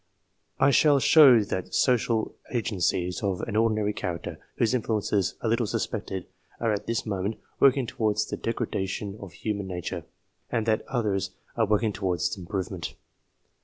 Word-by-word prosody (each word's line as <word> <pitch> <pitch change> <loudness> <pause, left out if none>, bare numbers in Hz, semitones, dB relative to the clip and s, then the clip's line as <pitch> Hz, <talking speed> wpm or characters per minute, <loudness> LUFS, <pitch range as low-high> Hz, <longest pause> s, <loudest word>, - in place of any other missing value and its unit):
I 140 - +5
shall 145 +1 +5
show 135 -6 +7
that 95 -3 -4
social 115 -3 +2 0.2
agencies 90 -6 0
of 95 -3 -1
an 110 - -4
ordinary 110 -2 +2
character, 90 -5 -4 0.2
whose 115 +1 +2
influences 105 -5 0
are - - -1
little 115 -1 +1
suspected, 95 -2 -3 0.3
are 115 -2 +1
at 105 - -4
this 115 -1 -1
moment 100 0 -2 0.2
working 135 -1 +5
towards 105 -2 0
the - - -4
degradation 100 -3 -3
of 100 -3 -9
human 100 -3 -3
nature, 90 -2 -4 0.5
and 115 - 0
that 110 -1 +2
others 100 -7 -1 0.2
are 115 -2 +2
working 105 +1 +2
towards 90 -3 -1
its 100 - -5
iprovement. 95 0 -4
105 Hz, 150 wpm, -27 LUFS, 95-115 Hz, 0.5 s, show